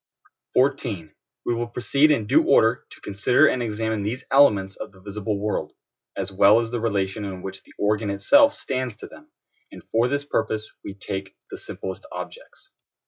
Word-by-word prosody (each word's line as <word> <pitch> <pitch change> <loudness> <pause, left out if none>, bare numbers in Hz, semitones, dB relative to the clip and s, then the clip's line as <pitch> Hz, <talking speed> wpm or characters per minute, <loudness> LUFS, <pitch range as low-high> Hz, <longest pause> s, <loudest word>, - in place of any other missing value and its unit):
14. 125 - 0 0.3
We 120 - +1
will 120 0 -2
proceed 140 +5 +2
in 140 -8 +2
due - - +4
order - - +3
to - - -16
consider 110 +8 +3
and 130 -4 +2
examine 110 -1 -2
these 115 +6 -3
elements 105 -9 +4
of - - -8
the 95 - -19
visible 100 +1 -4
world, 105 +1 -2 0.4
as 95 0 -3
well 100 +3 +6
as 115 -1 -3
the 120 - -2
relation 100 -2 -1
in 95 -2 -6
which 95 0 -7
the - - -20
organ 105 0 0
itself 285 - +4
stands 130 -4 -3
to - - -10
them, 305 +1 -15 0.4
and - - -12
for 115 +2 +3
this 140 +2 -2
purpose 110 -6 -1 0.2
we 95 - -7
take 95 -1 -6 0.2
the - - -6
simplest 95 -1 -7
objects. - - -10
110 Hz, 180 wpm, -24 LUFS, 100-125 Hz, 0.4 s, well